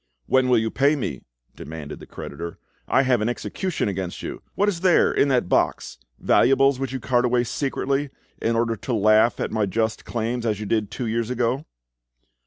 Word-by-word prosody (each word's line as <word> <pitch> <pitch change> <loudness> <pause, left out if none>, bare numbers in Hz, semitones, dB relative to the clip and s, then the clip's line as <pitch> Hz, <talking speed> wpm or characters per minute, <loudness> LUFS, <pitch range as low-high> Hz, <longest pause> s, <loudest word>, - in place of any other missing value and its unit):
"When 130 - +2
will 125 - +5
you 110 0 0
pay 140 +3 +3
me?" 70 - -4 0.3
demanded 75 -1 -8
the - - -12
creditor. 85 0 -7 0.3
"I 135 - +3
have 125 -4 +2
an 110 - +1
execution 180 - -2
against 95 -3 -4
you. - - -6
What 205 - +2
is 190 -5 0
there 185 -2 +4
in - - +3
that 125 -8 +1
box? - - 0 0.2
Valuables 135 +1 +3
which 135 -2 -3
you 135 - -3
cart 120 0 +1
away 125 0 +2
secretly, 135 +3 -1 0.3
in 115 0 +1
order 115 0 +1
to 120 +4 -4
laugh 110 +2 +4
at - - -2
my 110 -2 0
just 110 +2 -1
claims, 115 +1 -2
as 110 -3 -1
you 105 - -4
did 105 0 0
two 120 +3 -4
years 115 0 -1
ago?" 125 +3 -1
120 Hz, 195 wpm, -23 LUFS, 110-135 Hz, 0.3 s, will